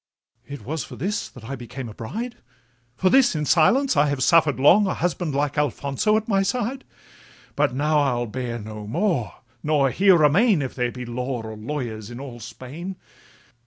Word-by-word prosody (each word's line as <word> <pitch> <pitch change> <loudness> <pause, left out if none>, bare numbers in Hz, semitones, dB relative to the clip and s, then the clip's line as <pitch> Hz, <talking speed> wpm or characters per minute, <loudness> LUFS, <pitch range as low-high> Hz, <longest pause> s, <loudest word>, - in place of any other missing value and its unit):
It 145 -1 -8
was 155 +3 -3
for - - -10
this 205 +2 -3
that 125 - -14
I 135 +5 -5
became 125 +1 -7
a 110 - -9
bride! 225 - -6 0.6
For 185 +5 +2
this 265 -9 +5
in 150 -1 -1
silence 250 - +3
I 145 0 +4
have 140 -2 -1
suffer'd 155 -4 +4
long 190 +9 +6
A 185 - -1
husband 175 -3 -2
like 145 +1 0
Alfonso 145 - +1
at 220 - -3
my 195 -3 +2
side; 245 +5 -2 0.7
But 120 - +1
now 150 +2 +2
I'll 125 -4 +1
bear 120 +1 -4
no 105 -1 -8
more, 145 - -1 0.3
nor 145 -3 +2
here 190 -1 +5
remain, 165 - +4
If 130 - -5
there 125 -2 -1
be 125 0 -7
law 125 0 -3
or 110 0 -7
lawyers 110 -2 -5
in 120 +1 -8
all 130 -3 -8
Spain. 130 - -8
145 Hz, 185 wpm, -23 LUFS, 120-180 Hz, 0.7 s, long